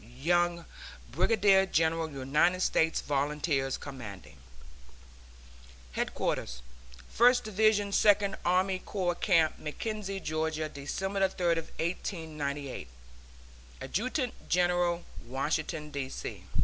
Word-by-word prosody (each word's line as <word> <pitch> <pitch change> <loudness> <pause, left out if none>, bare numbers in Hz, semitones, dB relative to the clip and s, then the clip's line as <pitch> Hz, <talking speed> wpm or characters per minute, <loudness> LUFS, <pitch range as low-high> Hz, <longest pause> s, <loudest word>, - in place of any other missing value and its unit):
YOUNG, 170 +8 0 0.5
Brigadier 195 -3 +4
General 160 -1 +1
United 150 +6 +1
States 160 -2 +2
Volunteers, 145 -1 0
Commanding. 100 - -9 1.5
HEADQUARTERS 60 0 -2 0.4
FIRST 245 +2 +4
DIVISION 215 -1 +2
SECOND 200 -1 +4
ARMY 185 +2 +2
CORPS 180 -3 -2
CAMP 165 -6 +3
MACKENZIE, 195 +5 -4
GA., 155 -1 -2
December 190 +7 -1
30, 170 -3 +1 0.2
1898. 155 - -3 0.9
ADJUTANT 255 - -3
GENERAL, 175 -1 +2 0.2
Washington, 150 +3 -2
D. 140 -2 -3
C. - - -7
170 Hz, 85 wpm, -30 LUFS, 145-195 Hz, 1.5 s, Brigadier